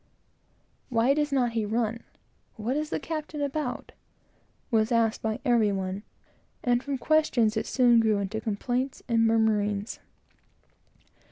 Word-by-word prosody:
Why 240 +2 +3
does 295 0 0
not 250 -4 +2
he 225 -1 -1
run? 225 +1 -1 0.5
What 225 +5 -2
is 305 +1 -2
the - - -2
captain 310 -1 -5
about? 285 -2 -3 0.8
was 220 0 +2
asked 230 -1 +2
by 220 +1 -2
every 235 -5 +3
one; 190 0 -3 0.6
and 245 -1 +2
from 280 0 -3
questions, 250 -6 +2
it 220 - -2
soon 245 -3 +4
grew 220 -2 +3
into 200 +2 -3
complaints 245 +5 -2
and 230 -2 +3
murmurings. 210 -2 +1
230 Hz, 135 wpm, -27 LUFS, 215-260 Hz, 0.8 s, soon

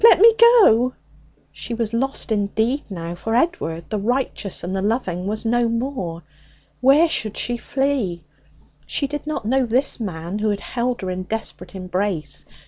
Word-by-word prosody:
let 465 - +8
me 455 +3 +8 0.3
go!' 240 - +4 0.6
She 235 - -5
was 230 -1 -2
lost 265 0 -1
indeed 220 +6 0
now. 170 -3 -5
For 225 +6 -3
Edward, 170 - 0
the 215 - 0
righteous 235 -3 -2
and 185 +2 -3
the 190 - -1
loving, 195 -4 -1
was 215 +2 -2
no 240 +1 +2
more. 230 - -3 0.6
Where 275 +6 +5
should 215 -9 -2
she 240 - 0
flee? 250 - -1 0.6
She 285 - 0
did 295 +1 -5
not 300 -7 -3
know 260 +2 +2
this 255 +4 +1
man 180 -2 -4
who 210 -1 +1
held 245 +1 -2
her 185 -1 -3
in 180 0 -3
desperate 185 -2 -5
embrace. 180 -5 -3
225 Hz, 160 wpm, -21 LUFS, 185-255 Hz, 0.6 s, let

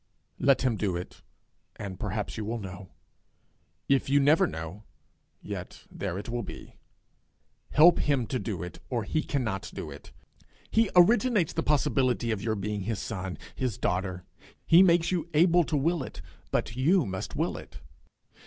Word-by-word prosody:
Let 135 -2 +3
him 125 -4 +1
do 95 -5 -1
it, 90 - -8 0.5
and 95 -2 -7
perhaps 105 0 -3
you 110 - -4
will 115 +3 -3
know; 95 -3 -8 1.0
if 135 -1 +2
you 140 +1 +5
never 145 +3 +4
know, 80 +6 -7 0.6
yet - - -7
there 95 -2 -4
it 100 - -6
will 120 +1 -2
be. - - -9 1.0
Help 165 +3 +6
him 140 -5 +1
to 130 +2 -2
do 95 -8 -4
it, 90 - -8
or 120 -3 -1
he 155 +9 0
cannot 110 -11 -2
do - - -6
it. - - -12 0.6
He 225 -2 +3
originates 210 0 +4
the - - 0
possibility 130 -5 +1
of 105 -3 -2
your 110 0 -1
being 105 0 -3
his 110 +2 -2
son, 95 -1 -5 0.2
his 125 -6 -2
daughter; 90 0 -2 0.4
he 170 +2 +7
makes 175 -2 +4
you 170 -2 -1
able 175 +2 +5
to 150 - 0
will 165 +3 +1
it, - - -8 0.3
but 115 - -1
you 155 +6 +3
must 95 -2 -5
will - - -1
it. - - -10
120 Hz, 165 wpm, -28 LUFS, 100-155 Hz, 1.0 s, he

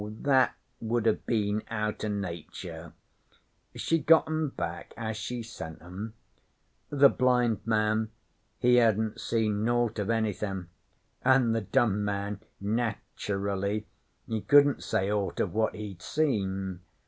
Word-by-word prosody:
That 135 -2 +4 0.2
would 115 0 -1
have 110 - +1
been 105 -2 +1
out 105 -2 -2
o' - - 0
Nature. 95 -6 -5 0.8
She 165 - +1
got 160 +2 +6
'em 155 -1 0
back 85 -9 -5
as 110 -1 -3
she 120 +2 -4
sent 80 -8 -8
'em. 95 +6 -7 0.7
The 140 -1 +7
blind 125 -4 +2
man 110 0 +2 0.5
he 125 0 +4
hadn't 110 -1 +2
seen 110 -2 0
naught 120 -1 +1
of 105 +1 -2
anythin', 105 -5 -1 0.5
an' 130 -2 +4
the 115 0 +1
dumb 105 -1 +2
man 100 0 -2 0.2
nature 105 -2 -2
ally 100 +2 -1 0.4
he 110 -2 -2
couldn't 145 +2 +5
say 95 +2 0
aught 100 -2 -1
of - - 0
what 110 +1 +1
he'd 100 -5 -7
seen. 95 - -1
110 Hz, 135 wpm, -29 LUFS, 100-120 Hz, 0.8 s, The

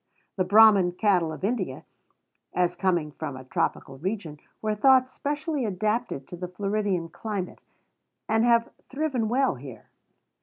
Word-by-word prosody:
The 185 - +1
Brahmin 200 -2 +6
cattle 180 -4 +2
of 155 - -8
India, 195 - -2 0.7
as 180 -1 +1
coming 175 -5 0
from 140 -2 -6
a 130 - -9
tropical 130 +1 -2
region, 175 -4 -4 0.2
were 215 -1 -1
thought 260 +4 +4
specially 295 0 -2
adapted 210 - -2
to - - -7
the 180 +1 -5
Floridian 195 -1 -1
climate, 200 0 -5 0.7
and 220 +1 +2
have 235 -1 +3 0.2
thriven 270 -6 -1
well 265 +3 +2
here. 125 -4 -11
200 Hz, 140 wpm, -26 LUFS, 175-230 Hz, 0.7 s, Brahmin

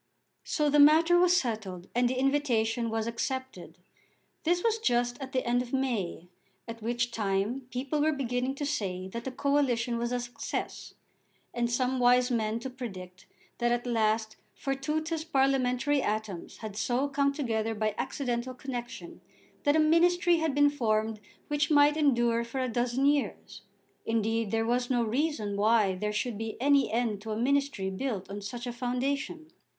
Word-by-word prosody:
So 300 -1 0
the 295 0 +3
matter 325 +4 +6
was 360 0 +5
settled, 210 - -4
and 245 0 +2
the 260 - -1
invitation 245 -4 +1
was 225 0 -1
accepted. 260 +3 -4 0.7
This 350 +2 +2
was 450 -1 +2
just 245 - 0
at 265 -1 -6
the 255 - -1
end 240 +1 +2
of 250 0 -8
May, 225 -10 -1 0.4
at 230 0 -7
which 240 +2 -1
time 215 +4 -1
people 270 +4 -2
were 310 +1 +3
beginning 255 -2 -2
to 290 - -3
say 185 -9 -2
that 235 +4 -6
the 265 - -3
coalition 255 -4 +1
was 235 +1 -2
a 250 - 0
success, 245 0 -5 0.6
and 240 -1 0
some 255 +2 0
wise 250 +1 +4
men 220 -1 0
to 265 - -4
predict 185 -8 -8 0.3
that 240 0 +2
at 240 +1 0
last 220 -2 0 0.2
fortuitous 305 +4 -2
parliamentary 270 -1 +1
atoms 215 -6 -3
had 210 -2 -6
so 250 +5 0
come 280 0 +1
together 225 -6 -2
by 215 0 0
accidental 250 -2 -2
connexion, 255 +6 -7 0.4
that 290 +1 +4
a - - +4
ministry 345 +2 +4
had 320 -4 -1
been 290 0 +5
formed 220 -5 0 0.3
which 295 0 0
might 295 -1 +5
endure 240 -6 +2
for 235 +3 -5
a 255 - 0
dozen 245 +3 0
years. 285 0 0 0.4
Indeed 225 -1 0
there 225 +1 0
was 245 +1 0
no 245 -2 +2
reason 230 -3 -1
why 210 -1 +3
there 210 +3 -2
should 210 +1 -2
be 225 -1 -5
any 280 +1 +3
end 225 -3 -1
to 220 - -8
a 215 - -2
ministry 275 -5 0
built 195 -2 -4
on 205 +1 -5
such 240 +4 -6
a 245 - -4
foundation. 275 +6 -3
245 Hz, 165 wpm, -29 LUFS, 225-280 Hz, 0.7 s, matter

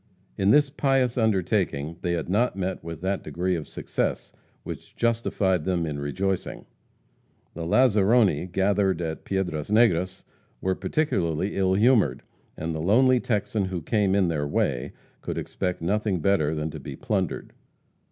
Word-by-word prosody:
In 95 0 +1
this 145 +4 +5
pious 135 -4 +1
undertaking 95 - 0
they 85 - -1
had 85 -3 -2
not 105 +6 +1
met 95 -2 -3
with 80 -1 -7
that 95 +1 -1
degree 90 +5 -1
of 80 -3 -5
success - - -3 0.3
which - - -8
justified 105 -6 +1
them 90 -2 0
in 75 -2 -4
rejoicing. 95 +7 -2 0.9
The 85 0 -5
lazaroni, 105 - +3
gathered 95 -1 +1
at 80 -2 -4
Piedras 90 -6 -2
Negras, 95 -4 +2 0.4
were 95 - 0
particularly 95 - -1
ill 95 -1 +2
humored, 105 - +3 0.3
and 80 +1 -3
the 80 - -3
lonely 125 +8 +4
Texan 105 -3 -1
who 90 -3 -4
came 100 0 +1
in 100 -3 +3
their 75 -3 -1
way 65 -3 -1 0.3
could - - -4
expect 90 -2 -3
nothing 100 +1 0
better 80 -3 +2
than 75 +1 -3
to 80 - -7
be 70 0 -7
plundered. - - -2
95 Hz, 150 wpm, -25 LUFS, 80-105 Hz, 0.9 s, this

